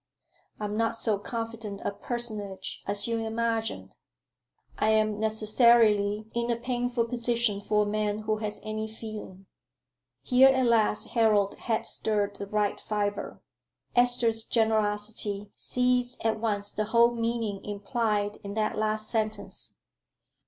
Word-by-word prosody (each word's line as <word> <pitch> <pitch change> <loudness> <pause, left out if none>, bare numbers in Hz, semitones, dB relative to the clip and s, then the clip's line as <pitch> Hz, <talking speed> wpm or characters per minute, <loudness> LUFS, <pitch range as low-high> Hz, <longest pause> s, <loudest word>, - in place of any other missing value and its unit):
I 210 - -3
am 205 0 -3
not 230 0 +1
so 220 -3 0
confident 225 -2 -5
a - - 0
personage 205 -4 -4
as 200 +2 +4
you 230 -1 0
imagine. 225 - -2 0.9
I 215 - +3
am 215 -1 +2
necessarily 215 -1 +3
in 235 0 -1
a 235 - +2
painful 245 0 -1
position 235 -3 0
for 210 +1 +2
a - - -2
man 210 0 -1
who 215 0 0
has 215 -1 -4
any 215 0 -3
feeling." 215 -3 -9 0.8
Here 260 +1 +6
at 260 -1 +3
last 220 -2 +2
Harold 210 -4 +3
had 225 -2 -2
stirred 205 -2 -1
the 200 - -6
right 210 0 0
fibre. 205 -1 -3 0.5
Esther's 245 -2 +3
generosity 210 -2 0
seized 250 -1 0
at 220 -1 +1
once 205 -2 -1
the 215 - -1
whole 235 +2 +4
meaning 230 -3 -2
implied 205 0 -1
in 200 0 -8
that 215 -1 0
last 215 0 -1
sentence. 215 -1 -3
215 Hz, 135 wpm, -28 LUFS, 210-230 Hz, 0.9 s, Here